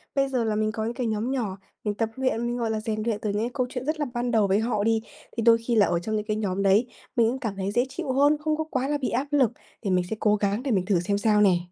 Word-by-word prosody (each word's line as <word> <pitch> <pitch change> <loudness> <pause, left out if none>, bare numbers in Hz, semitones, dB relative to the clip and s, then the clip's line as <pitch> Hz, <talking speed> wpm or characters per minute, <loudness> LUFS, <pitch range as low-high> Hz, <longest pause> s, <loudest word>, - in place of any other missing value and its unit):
Bây 275 -1 +2
giờ 255 -3 0
là 220 -1 0
mình 215 0 +1
có 220 0 -3
những 230 - -2
cái 245 -1 -2
nhóm 220 +3 -1
nhỏ, 220 -8 -2 0.3
mình 210 - -1
tập 220 +1 -1
luyện, 260 -3 0
mình, 240 0 -2
gọi 230 -2 -1
là, 220 - -1
rèn 215 0 -3
luyện 220 -2 -1
từ 215 - -1
những 205 +1 -1
cái 235 - -1
câu 255 -3 0
chuyện 250 0 -5
rất 310 +1 -1
là 295 - +1
ban 240 0 -1
đầu 220 -3 +3
với 195 +2 +3
họ 220 -2 0
đi, 225 0 +2 0.4
thì 230 - 0
đôi 230 0 +7
khi 230 +1 -2
là 210 -3 +6
ở 175 - 0
trong 215 +5 -3
những 210 0 -2
cái 215 0 -1
nhóm 200 -2 -1
đấy, 200 +5 +4 0.3
mình 235 -3 +4
cũng 260 +3 -3
cảm 220 -7 -3
thấy 195 0 -2
dễ 240 +4 +2
chịu 265 - -4
hơn, 285 +3 +4
không 305 0 0
có 315 - 0
quá 270 -4 -2
là 295 +1 0
bị 270 - -2
áp 265 +5 -1
lực, 270 -6 +3 0.3
thì 205 - -2
mình 180 -1 +2
sẽ - - -2
cố 210 -1 +3
gắng 205 +3 -1
để 275 - -1
mình 190 -4 +1
thử 190 -3 +2
xem 200 +4 0
sao 210 0 +3
nè. 190 -4 +5
225 Hz, 330 wpm, -26 LUFS, 210-255 Hz, 0.4 s, đôi